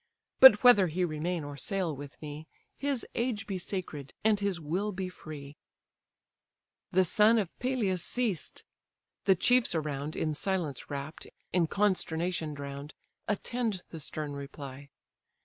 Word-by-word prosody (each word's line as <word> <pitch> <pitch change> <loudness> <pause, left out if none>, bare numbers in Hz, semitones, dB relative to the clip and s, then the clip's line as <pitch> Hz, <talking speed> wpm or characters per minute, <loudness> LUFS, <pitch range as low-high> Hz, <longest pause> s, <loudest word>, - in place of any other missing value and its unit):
But 260 -5 +10
whether 210 -7 +8
he 180 +3 0
remain 165 +1 -2
or 145 0 -6
sail 180 +1 -1
with 145 +1 -10
me, 150 +1 -7 0.3
His 280 -3 -1
age 235 -3 -1
be 195 -3 -3
sacred, 165 -7 -5
and 215 -1 +4
his 200 -4 -1
will 180 +7 -1
be 185 -1 -4
free." 155 -4 -9
GREEK 140 0 -10 1.4
GALLEY 185 - +4
The - - +3
son 215 +6 +5
of 200 -6 -2
Peleus 220 -9 0
ceased: 225 -10 -1 0.6
the 195 -2 +6
chiefs 245 +1 +3
around 150 -1 -2
In 155 -1 -1
silence 165 -4 -2
wrapt, 140 +2 -6 0.3
in 170 -2 +3
consternation 175 -5 0
drown'd, 140 +1 -7 0.3
Attend 215 -2 -1
the 165 - -8
stern 150 0 -4
reply. 140 -1 -8
175 Hz, 145 wpm, -30 LUFS, 150-205 Hz, 1.4 s, But